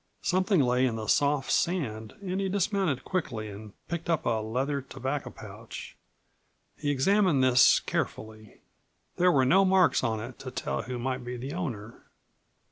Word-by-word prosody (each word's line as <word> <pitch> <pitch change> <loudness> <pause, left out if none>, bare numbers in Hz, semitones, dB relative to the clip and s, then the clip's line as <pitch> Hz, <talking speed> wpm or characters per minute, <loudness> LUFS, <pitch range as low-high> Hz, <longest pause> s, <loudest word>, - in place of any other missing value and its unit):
Something 185 -1 +2
lay 125 0 +2
in 115 - -2
the 110 -1 -4
soft 145 +2 +2
sand 110 -12 -1
and 190 0 -2
he 195 - -1
dismounted 195 - 0
quickly 120 - -3
and 105 +1 -10 0.2
picked 170 0 -4
up 165 -3 +1
a 115 -2 +1
leather 130 +6 -2
tobacco 135 +1 -4
pouch. - - -10 0.8
He 145 - -3
examined 160 +1 +3
this 125 -1 +6
carefully. 110 -1 -5 0.6
There 180 +1 +4
were 135 -4 +3
no 190 +9 +5
marks 190 -5 +4
on 110 -3 0
it 120 +3 -8
to 130 - -6
tell 125 - -3
who 125 -1 -5
might 130 +1 -3
be 125 +1 -5
the 130 +4 -6
owner. 120 - -5
130 Hz, 160 wpm, -28 LUFS, 120-180 Hz, 0.8 s, this